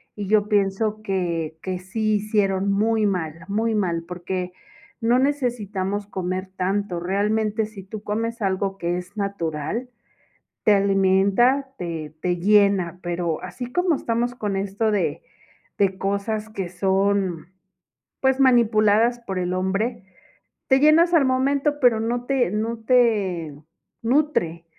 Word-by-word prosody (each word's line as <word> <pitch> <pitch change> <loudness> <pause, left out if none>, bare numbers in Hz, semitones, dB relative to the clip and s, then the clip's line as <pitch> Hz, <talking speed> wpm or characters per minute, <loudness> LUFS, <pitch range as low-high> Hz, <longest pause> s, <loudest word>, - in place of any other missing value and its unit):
y 205 -2 -5
yo 210 0 +3
pienso 210 +1 0
que 170 -6 -2
que 185 -1 -3
sí 215 +3 -1
hicieron 200 -2 +1
muy 215 +2 +2
mal, 180 -6 -1 0.2
muy 220 +2 0
mal, 170 -5 0
porque 180 +1 -4 0.5
no 235 +2 +3
necesitamos 210 -8 -1
comer 185 -1 -3
tanto. 190 -1 -1
Realmente, 210 +4 0
si 210 -2 -10
tú 205 +2 -8
comes 230 +3 -3
algo 195 0 -1
que 175 -1 -1
es 180 +4 -9
natural, 200 - -3 0.7
te 210 - +5
alimenta, 200 +7 +3
te 160 -3 -5
te 180 -1 0
llena, 195 -2 +3
pero 170 -2 -2
así 240 +7 -6
como 355 +4 +1
estamos 240 -1 -1
con 210 -5 -3
esto 200 +3 -1
de 205 - -1 0.5
de 195 -2 +1
cosas 200 +3 -2
que 195 -5 -5
son, 190 -2 0 0.7
pues, 265 0 +2
manipuladas 235 -2 +4
por 195 -5 -5
el 180 0 -1
hombre, 195 +5 -1 0.6
te 265 0 +4
llenas 320 +4 +5
al 300 -4 +5
momento, 275 +3 +1
pero 240 -3 +4
no 240 +2 -2
te 260 -7 +1
no 220 +3 -2
te 205 - +2 0.5
nutre. 230 - 0
205 Hz, 135 wpm, -23 LUFS, 185-230 Hz, 0.7 s, te